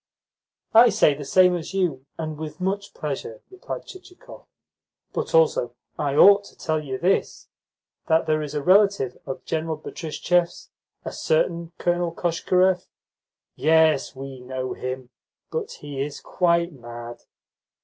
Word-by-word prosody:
"I 235 +2 +8
say 200 -8 +4
the 145 +1 -7
same 180 +5 +4
as 175 +2 -6
you, 150 -8 -1
and 155 -1 -4
with 155 +1 -7
much 195 +2 -3
pleasure," 135 -7 -5
replied 380 - -7
Chichikov. 375 +6 -14 0.7
"But - - -2
also 485 0 +3 0.2
I 140 -1 0
ought 200 +5 +7
to - - -16
tell 155 -1 -1
you 130 -2 -4
this: 185 +7 0 0.6
that 160 0 +3
there 155 0 +1
is 150 0 -5
a 145 - -2
relative 195 -8 +3
of 135 - -6
General 160 -1 -2
Betristchev's, 170 +3 -2 0.3
a - - -4
certain 170 +1 0
Colonel 175 -1 0
Koshkarev 180 +2 +1 0.4
" - - -69 0.2
"Yes, 160 -3 +3
we 135 0 -8
know 130 0 -4
him; 130 0 -6 0.4
but 470 -3 -3
he 145 -2 -6
is 145 +1 -4
quite 170 -1 +1
mad." 120 -2 -9
160 Hz, 140 wpm, -24 LUFS, 140-185 Hz, 0.7 s, I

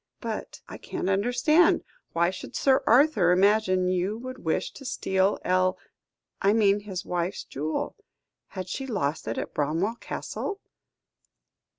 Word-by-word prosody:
"But - - -5
I - - -9
can't 190 - -3
understand. 245 - +3 0.3
Why 170 +1 +2
should 190 - -9
Sir 265 -1 +3
Arthur 240 - +5
imagine 185 -1 +3
you 185 +3 0
would 255 +2 -7
wish 160 - -1
to 275 - -12
steal 190 -6 +1
El 185 0 +2 0.6
I 200 +1 +4
mean 205 -2 +4
his 195 -3 -6
wife's 175 +1 -2
jewel. 155 +3 -3 0.5
Had 185 -2 -6
she 265 +8 -4
lost 165 - -2
it 115 - -2
at - - -4
Bramwell 165 +10 0
Castle?" 405 - -5
195 Hz, 135 wpm, -27 LUFS, 180-235 Hz, 0.6 s, Arthur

